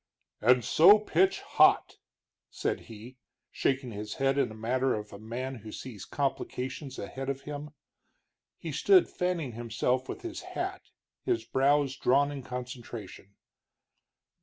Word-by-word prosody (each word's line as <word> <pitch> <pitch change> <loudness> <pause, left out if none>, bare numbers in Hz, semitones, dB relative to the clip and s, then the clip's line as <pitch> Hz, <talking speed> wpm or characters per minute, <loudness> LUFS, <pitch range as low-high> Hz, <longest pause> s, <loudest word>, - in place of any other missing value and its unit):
"And 125 +1 +4
so 190 +7 +8
pitch 190 -2 +2
hot!" - - +4 0.5
said - - -2
he, 115 +4 -11 0.3
shaking 130 -2 0
his 105 0 -6
head 135 0 +1
in - - +2
the 110 - -9
manner 125 +4 0
of 105 -1 -7
a 100 - -9
man 125 +4 -5
who 110 -1 -10
sees 105 -6 -8
complications 135 0 -3
ahead 135 +7 -5
of 135 0 -3
him. 145 +1 -6 0.9
He - - -6
stood 380 -3 +5
fanning 180 -7 -2
himself 120 +3 -1
with - - -6
his 345 -1 -5
hat, 365 +1 -4 0.4
his 360 -2 0
brows 140 0 +2
drawn 140 +3 +3
in 140 -2 -5
concentration. 120 -6 -8
130 Hz, 135 wpm, -29 LUFS, 115-145 Hz, 0.9 s, so